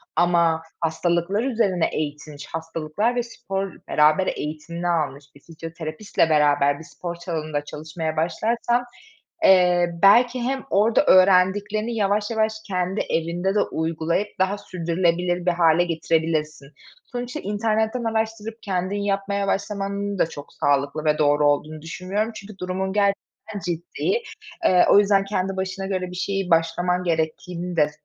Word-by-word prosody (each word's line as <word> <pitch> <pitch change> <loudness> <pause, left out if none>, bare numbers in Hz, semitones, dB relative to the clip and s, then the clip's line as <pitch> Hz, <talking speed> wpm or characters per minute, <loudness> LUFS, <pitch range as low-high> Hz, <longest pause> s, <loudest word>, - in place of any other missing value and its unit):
ama 170 -2 +3 0.2
hastalıklar 170 +5 0
üzerine 220 -9 +1
eğitilmiş, 150 -1 -5
hastalıklar 165 +7 -2
ve 245 - 0
spor 195 -5 -4 0.2
beraber 155 +5 +3
eğitimini 165 +3 -4
almış 150 -5 -1
bir - - -15
fizyoterapistle 165 +3 -3
beraber 145 -2 +3
bir - - -10
spor 175 +1 -7
salonunda 155 -4 -4
çalışmaya 155 +1 -5
başlarsan, 230 +9 0 0.6
eee, 180 -2 +5
belki 245 +5 +6
hem 265 +1 -2
orada 215 +3 +3
öğrendiklerini 195 +4 +4
yavaş 205 +1 0
yavaş 220 -1 +1
kendi 185 0 -1
evinde 175 +4 -1
de - - +4
uygulayıp 160 +4 -1
daha 190 +2 +1
sürdürülebilir 175 -1 -1
bir 180 - +4
hâle 170 -1 +4
getirebilirsin. 160 -3 -1 0.5
Sonuçta 245 0 -4
internetten 220 +3 -1
araştırıp 225 -1 -2
kendin 185 0 -2
yapmaya 200 0 -1
başlamanın 200 0 -2
da - - +3
çok 145 -2 -10
sağlıklı 145 +2 0
ve 150 0 +3
doğru 145 -1 +3
olduğunu 155 +1 -1
düşünmüyorum 190 +7 -3
çünkü 205 -1 -10
durumun 190 +1 -3
gerçekten 200 0 -2
ciddi. 175 - -2 0.4
Eee, 180 -1 +5
o - - +7
yüzden 200 -1 +3
kendi 195 -1 -2
başına 190 0 -3
göre 185 -2 -3
bir - - -8
şeyi 195 0 -2
başlaman 175 +2 +1
gerektiğini 170 +1 -2
de 150 -1 +4
180 Hz, 135 wpm, -23 LUFS, 160-200 Hz, 0.6 s, o